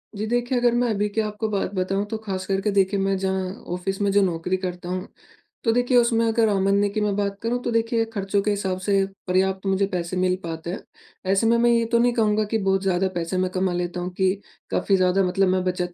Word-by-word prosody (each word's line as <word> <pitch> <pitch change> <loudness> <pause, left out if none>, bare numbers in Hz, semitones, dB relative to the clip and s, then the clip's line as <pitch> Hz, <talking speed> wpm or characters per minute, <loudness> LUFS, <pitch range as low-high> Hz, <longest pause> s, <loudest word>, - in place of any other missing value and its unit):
जी, 210 - -3
देखिए, 245 +2 0
अगर 240 -1 +3
मैं 240 0 +2
अभी 210 -1 0
की 220 - +3
आपको 210 +1 -3
बात 200 -1 -2
बताऊँ 195 +2 0
तो 220 - -1
ख़ास 195 -4 -5
करके 195 +2 0
देखिए 195 0 +2
मैं 195 0 +1
जहाँ 190 -1 -1 0.2
ऑफ़िस 195 +2 -3
में 200 - +2
जो 200 0 +4
नौकरी 180 0 0
करता 180 -1 -5
हूँ 185 0 -3 0.6
तो 225 - +3
देखिए 245 +1 +2
उसमें 235 -1 +3
अगर 225 -1 +2
आमदनी 200 +1 +2
की 215 +1 -2
मैं 205 -1 0
बात 200 -1 -1
करूँ 240 +2 -1
तो 240 - -1
देखिए 230 0 +1
खर्चों 200 0 0
के 210 - 0
हिसाब 190 -2 -1
से 195 +1 +2 0.2
पर्याप्त 190 +1 +1
मुझे 195 +1 +2
पैसे 180 -1 -3
मिल 185 0 +2
पाते 165 0 -5
हैं। - - -4 0.5
ऐसे 200 +3 +3
में 235 +1 +4
मैं 240 +1 +3
ये 230 -1 +3
तो 235 - +4
नहीं 245 0 +3
कहूँगा 215 -2 +2
कि 225 - +2
बहुत 195 -1 +1
ज़्यादा 190 0 +1
पैसे 170 +2 -2
मैं 185 0 +1
कमा 185 0 0
लेता 175 0 -3
हूँ 180 - -3
कि 190 -1 +3 0.4
काफ़ी 195 - +2
ज़्यादा 185 +1 +3
मतलब 190 +1 +2
मैं 185 0 +1
बचत 180 -1 -2
195 Hz, 235 wpm, -23 LUFS, 185-220 Hz, 0.6 s, जो